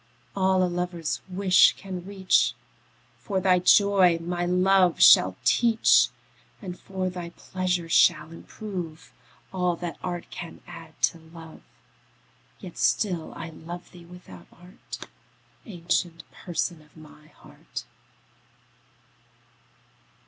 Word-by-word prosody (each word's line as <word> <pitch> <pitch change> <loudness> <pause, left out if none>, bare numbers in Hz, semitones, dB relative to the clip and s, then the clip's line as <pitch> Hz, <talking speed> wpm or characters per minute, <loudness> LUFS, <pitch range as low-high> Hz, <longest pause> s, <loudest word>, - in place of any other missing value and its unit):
All 190 -1 +2
a - - +3
lover's 175 -2 -3
wish 185 0 +4
can 185 -2 -7
reach, 180 -12 +1 0.6
For 190 +9 -2
thy 185 -1 +3
joy 185 -2 +4
my 175 +1 -3
love 180 0 +3
shall 90 0 +7
teach; 225 - +4 0.5
And 180 -5 -8
for 185 -1 -4
thy 175 -1 -7
pleasure 180 -1 -3
shall 160 -1 +3
improve 175 -2 -8 0.4
All 180 -2 0
that 175 0 -7
art 175 -2 -5
can 170 -2 -9
add 160 -1 -13
to 170 - +2
love. 160 0 -14 1.0
Yet - - -10
still 180 -6 0
I 165 - -7
love 170 +3 -10
thee 175 -2 -14
without 170 - -14
art, 180 +2 -12 0.6
Ancient 175 -3 -2
Person 170 -1 -4
of 150 +1 -23
my 150 -1 -16
heart. - - -11
175 Hz, 110 wpm, -25 LUFS, 165-185 Hz, 1.0 s, shall